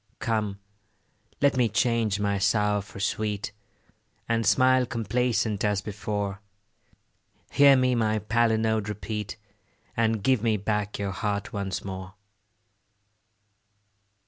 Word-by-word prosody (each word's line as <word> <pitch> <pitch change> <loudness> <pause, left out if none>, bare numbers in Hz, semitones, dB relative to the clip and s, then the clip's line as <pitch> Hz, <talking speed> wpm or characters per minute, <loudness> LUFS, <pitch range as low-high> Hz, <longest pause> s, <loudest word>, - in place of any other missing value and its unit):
Come, 105 -4 -2 0.8
let 140 -1 +4
me 125 -3 +3
change 115 -2 +1
my 100 -1 0
sour 105 0 +2
for 100 0 -12
sweet, 105 0 -2 0.8
And 115 -1 0
smile 130 -1 +4
complacent 115 -2 0
as 105 -2 +1
before: 105 -1 -4 1.1
Hear 140 -1 +7
me 130 -1 +3
my 110 -2 +1
palinode 110 0 +1
repeat, 105 +1 -5 0.6
And 110 -2 +1
give 130 -3 +3
me 110 -2 +2
back 105 0 -2
your 100 -1 -2
heart 100 +1 -3
once 100 -2 -3
more. 95 +1 -7
105 Hz, 110 wpm, -26 LUFS, 100-115 Hz, 1.1 s, Hear